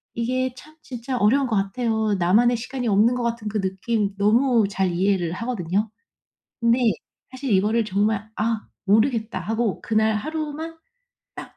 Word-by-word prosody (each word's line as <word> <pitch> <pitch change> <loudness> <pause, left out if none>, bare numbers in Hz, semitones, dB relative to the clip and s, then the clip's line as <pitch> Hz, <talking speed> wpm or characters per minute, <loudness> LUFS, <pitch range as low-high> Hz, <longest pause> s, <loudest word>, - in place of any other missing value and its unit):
이게 255 +2 -1
참 310 +4 -14
진짜 250 0 -5
어려운 260 +7 +3
것 225 - -1
같아요. 220 +1 0
나만의 225 +8 +4
시간이 245 +1 -4
없는 215 +3 +4
것 250 - -2
같은 230 -2 -2
그 210 0 -1
느낌 200 +2 -1
너무 225 +2 +3
잘 190 -2 0
이해를 185 -1 +1
하거든요. 205 -2 -2 0.7
근데 235 +1 +3 0.5
사실 260 -1 -4
이거를 215 +4 +2
정말 210 +1 0
'아 220 0 -1 0.2
모르겠다.' 220 +2 +2
하고 225 -1 -1
그날 220 -1 +1
하루만 310 +6 -4 0.6
딱 - - -10
225 Hz, 300 characters per minute, -23 LUFS, 205-245 Hz, 0.7 s, 나만의